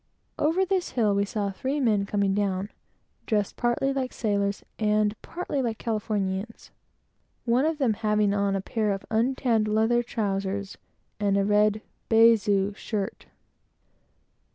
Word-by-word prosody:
Over 335 Hz, +6 st, +2 dB
this 375 Hz, -1 st, -1 dB
hill 215 Hz, -5 st, +2 dB
we 200 Hz, 0 st, +1 dB
saw 200 Hz, -1 st, -2 dB
three 265 Hz, +9 st, -2 dB
men 210 Hz, -6 st, +2 dB
coming 200 Hz, -1 st, +1 dB
down, 195 Hz, 0 st, -1 dB, 0.6 s
dressed 210 Hz, -3 st, 0 dB
partly 245 Hz, +3 st, 0 dB
like 260 Hz, -2 st, -2 dB
sailors 200 Hz, -2 st, -1 dB, 0.2 s
and 210 Hz, -1 st, +2 dB
partly 335 Hz, -5 st, -3 dB
like 230 Hz, -3 st, -2 dB
Californians; 210 Hz, -2 st, -3 dB, 0.7 s
one 245 Hz, +4 st, +2 dB
of 320 Hz, -1 st, -1 dB
them 260 Hz, -7 st, +2 dB
having 210 Hz, -1 st, +1 dB
on 200 Hz, -1 st, +1 dB
a 195 Hz, -, -1 dB
pair 210 Hz, 0 st, -1 dB
of 195 Hz, -, -6 dB
untanned 230 Hz, -1 st, +1 dB
leather 220 Hz, +3 st, +2 dB
trowsers 200 Hz, -4 st, -3 dB, 0.4 s
and 200 Hz, -1 st, +2 dB
a 200 Hz, -, +2 dB
red 210 Hz, +1 st, +2 dB, 0.3 s
baize 225 Hz, -2 st, +5 dB, 0.2 s
shirt. 200 Hz, -1 st, -4 dB
215 Hz, 135 wpm, -26 LUFS, 200-235 Hz, 0.7 s, baize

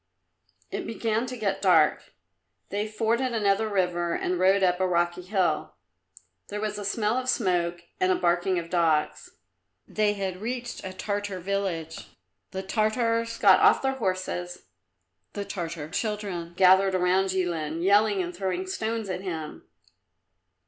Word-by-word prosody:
It -, -, -4 dB
began 225 Hz, +1 st, -1 dB
to 250 Hz, 0 st, -6 dB
get 195 Hz, -3 st, -1 dB
dark; 165 Hz, -6 st, +3 dB, 0.5 s
they 205 Hz, +2 st, -2 dB
forded 230 Hz, +4 st, 0 dB
another 210 Hz, 0 st, +1 dB
river 175 Hz, -3 st, 0 dB
and 180 Hz, 0 st, -1 dB
rode 190 Hz, +1 st, +4 dB
up 180 Hz, -1 st, +2 dB
a 185 Hz, -, +2 dB
rocky 175 Hz, 0 st, 0 dB
hill; 180 Hz, -4 st, -1 dB, 0.7 s
there 205 Hz, -, -5 dB
was 210 Hz, -1 st, -3 dB
a -, -, -5 dB
smell 210 Hz, +3 st, 0 dB
of 255 Hz, 0 st, -4 dB
smoke 175 Hz, -6 st, 0 dB, 0.2 s
and 185 Hz, -, +3 dB
a -, -, +3 dB
barking 175 Hz, +1 st, +1 dB
of 170 Hz, -1 st, -5 dB
dogs. 165 Hz, -4 st, +1 dB, 0.6 s
They 210 Hz, -1 st, +1 dB
had 190 Hz, -2 st, -4 dB
reached 240 Hz, +1 st, -4 dB
a 190 Hz, -, -5 dB
Tartar 200 Hz, 0 st, -3 dB
village. 180 Hz, -4 st, -3 dB, 0.4 s
The 190 Hz, 0 st, -5 dB
Tartars 230 Hz, +3 st, 0 dB
got 195 Hz, -3 st, +6 dB
off -, -, +5 dB
their 265 Hz, -, +2 dB
horses; 185 Hz, -5 st, -3 dB, 0.7 s
the 205 Hz, -, -4 dB
Tartar 170 Hz, -6 st, -5 dB
children 195 Hz, -6 st, -3 dB
gathered 190 Hz, +1 st, +5 dB
round 185 Hz, +1 st, +2 dB
Jilin, 170 Hz, -3 st, -2 dB
yelling 205 Hz, 0 st, +4 dB
and 175 Hz, 0 st, -6 dB
throwing 185 Hz, 0 st, -2 dB
stones 220 Hz, +3 st, -3 dB
at 185 Hz, -1 st, -3 dB
him. 160 Hz, -5 st, -6 dB
190 Hz, 145 wpm, -26 LUFS, 175-210 Hz, 0.7 s, got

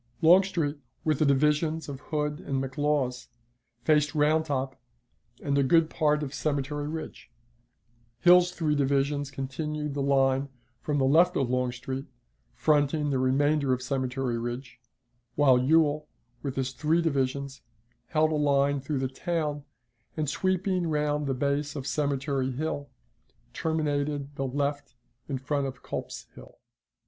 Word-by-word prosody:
Longstreet, 170 Hz, -3 st, +4 dB, 0.3 s
with 155 Hz, -3 st, +1 dB
the 155 Hz, -, +3 dB
divisions 150 Hz, +3 st, +2 dB
of 140 Hz, -2 st, -6 dB
Hood 150 Hz, -1 st, -2 dB
and 140 Hz, -, -4 dB
McLaws, 135 Hz, -1 st, -1 dB, 0.6 s
faced 150 Hz, +3 st, +2 dB
Round 155 Hz, +1 st, +3 dB
Top 135 Hz, -3 st, -2 dB, 0.7 s
and 140 Hz, -1 st, 0 dB
a -, -, +4 dB
good 160 Hz, +3 st, +3 dB
part 150 Hz, -1 st, +1 dB
of 135 Hz, -1 st, -5 dB
Cemetery 145 Hz, 0 st, -2 dB
Ridge; 160 Hz, +1 st, -7 dB, 0.9 s
Hill's 180 Hz, 0 st, +7 dB
three 160 Hz, -4 st, 0 dB
divisions 140 Hz, 0 st, +1 dB
continued 150 Hz, +2 st, -4 dB
the 140 Hz, -, -2 dB
line 135 Hz, 0 st, +2 dB, 0.3 s
from 150 Hz, -1 st, -1 dB
the 135 Hz, -, +2 dB
left 175 Hz, +6 st, +4 dB
of 130 Hz, -3 st, 0 dB
Longstreet, 125 Hz, +1 st, -2 dB, 0.5 s
fronting 150 Hz, -1 st, +2 dB
the 135 Hz, -, +1 dB
remainder 140 Hz, +1 st, +2 dB
of 125 Hz, 0 st, -2 dB
Cemetery 130 Hz, -2 st, -2 dB
Ridge; 120 Hz, +1 st, -6 dB, 0.6 s
while 135 Hz, -4 st, +5 dB
Ewell, 150 Hz, +2 st, +3 dB, 0.3 s
with 140 Hz, -2 st, -4 dB
his 130 Hz, -1 st, -1 dB
three 155 Hz, +5 st, +1 dB
divisions, 140 Hz, -2 st, -1 dB, 0.5 s
held 155 Hz, 0 st, +2 dB
a -, -, +1 dB
line 140 Hz, -1 st, +2 dB
through 140 Hz, +2 st, -2 dB
the 130 Hz, 0 st, 0 dB
town, 150 Hz, +1 st, -3 dB, 0.5 s
and, 155 Hz, -1 st, -1 dB
sweeping 185 Hz, +2 st, 0 dB
round 150 Hz, -1 st, 0 dB
the 135 Hz, -, 0 dB
base 140 Hz, +2 st, -1 dB
of 135 Hz, -3 st, -5 dB
Cemetery 140 Hz, -2 st, -1 dB
Hill, 145 Hz, 0 st, -3 dB, 0.6 s
terminated 145 Hz, -2 st, -1 dB
the 135 Hz, -1 st, -3 dB
left 145 Hz, -1 st, -2 dB, 0.3 s
in 135 Hz, -, -1 dB
front 140 Hz, +1 st, -1 dB
of 130 Hz, -, -9 dB
Culps's -, -, -6 dB
Hill. -, -, -14 dB
145 Hz, 140 wpm, -28 LUFS, 135-150 Hz, 0.9 s, Hill's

